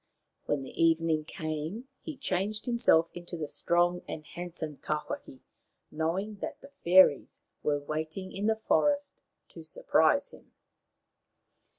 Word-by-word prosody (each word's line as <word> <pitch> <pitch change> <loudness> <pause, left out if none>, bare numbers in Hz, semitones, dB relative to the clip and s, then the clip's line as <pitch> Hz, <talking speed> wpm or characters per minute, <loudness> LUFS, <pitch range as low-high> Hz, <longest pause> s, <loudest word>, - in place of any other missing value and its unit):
When 145 -2 0
the 135 - -2
evening 165 -1 +3
came 155 - -4
he 315 -3 -7
changed 210 -3 -2
himself 200 -9 +3
into 175 0 -6
the 155 -2 -3
strong 175 +3 +1
and 155 - -6
handsome 165 -4 -6
Tawhaki, 150 -3 -4 0.5
knowing 180 +7 -2
that - - -5
the 275 - -14
fairies 175 -4 +5 0.2
were 150 -1 +1
waiting 155 +6 -4
in 205 +2 -2
the 220 - +3
forest 285 +6 +1 0.4
to - - -11
surprise - - +2
him. - - -17
170 Hz, 125 wpm, -30 LUFS, 155-210 Hz, 0.5 s, fairies